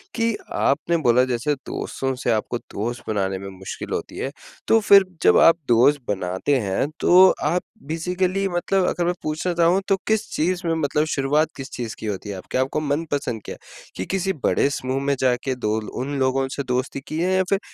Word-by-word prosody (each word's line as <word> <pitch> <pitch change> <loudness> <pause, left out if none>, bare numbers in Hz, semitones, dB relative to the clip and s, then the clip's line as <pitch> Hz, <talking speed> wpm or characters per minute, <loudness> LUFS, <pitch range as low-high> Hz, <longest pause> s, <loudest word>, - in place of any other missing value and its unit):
कि 230 -1 +1 0.2
आपने 165 +4 +1
बोला 125 -5 +4
जैसे 125 +3 0
दोस्तों 135 0 -3
से 120 - +2
आपको 110 +2 -1 0.2
दोस्त 120 +4 -3
बनाने 95 -3 -1
में 100 - -7
मुश्किल 95 - -7
होती - - -4
है, 135 - -3 0.4
तो 225 - +5
फिर 200 -2 +6 0.2
जब - - +6
आप 165 - +7
दोस्त 125 +5 +4
बनाते 95 +7 -1
हैं, 105 +6 -1
तो 185 +1 +7
आप 170 +4 +1 0.3
बेसिकली 180 +4 -1
मतलब 180 +2 +1
अगर 175 - 0
मैं 175 - +1
पूछना 155 +4 -1
चाहूँ 170 +3 +3
तो 195 - +3
किस 220 -1 +1
चीज़ 175 +3 0
में 165 - +2
मतलब 150 -1 0
शुरुआत 145 +3 +2
किस 135 0 -7
चीज़ 120 -3 -5
की - - -7
होती 100 +2 -8
आप 95 -2 -7
क्या 130 - +2
आपको 135 +3 -1
मनपसंद 145 -5 -2
क्या - - -6
है? - - -21 0.4
कि 95 - -4
किसी 195 0 -1
बड़े - - +2
समूह 130 -1 -2
में 140 0 +1
जाके 130 +1 +1
दो 110 -3 -1
ल 105 - -8 0.2
उन 140 +1 -3
लोगों 135 0 +1
से 140 - -3
दोस्ती 130 +2 -2
की 155 - -3
है 180 +2 +1
या 190 - +3
फिर 195 - +2
140 Hz, 205 wpm, -22 LUFS, 125-175 Hz, 0.4 s, आप